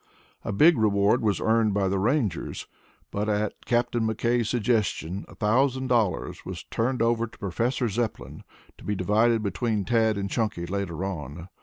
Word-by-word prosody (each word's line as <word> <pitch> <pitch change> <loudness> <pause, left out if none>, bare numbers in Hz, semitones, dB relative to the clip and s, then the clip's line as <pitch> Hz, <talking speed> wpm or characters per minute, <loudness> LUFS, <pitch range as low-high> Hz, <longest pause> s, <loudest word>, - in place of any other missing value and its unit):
A - - -3
big 150 +8 +5
reward 105 +1 +3
was 105 -5 +1
earned 110 -2 +2
by 100 -1 +1
the 95 +1 0
Rangers, 110 - -1 0.5
but 105 +1 -2
at 105 0 0
Captain 120 0 +1
McKay's 115 +1 0
suggestion, 105 -6 0
a - - -14
thousand 130 +4 +1
dollars 110 -8 0
was - - -7
turned 120 +1 -1
over 115 0 +1
to - - -17
Professor 120 +6 -1
Zepplin 100 - -4 0.4
to - - -13
be 105 - -2
divided 110 +4 +2
between 105 -1 -1
Tad 110 -3 +2
and 100 0 -2
Chunky 105 -5 -2
later 95 -1 -3
on. 85 -1 -6
110 Hz, 160 wpm, -26 LUFS, 100-120 Hz, 0.5 s, big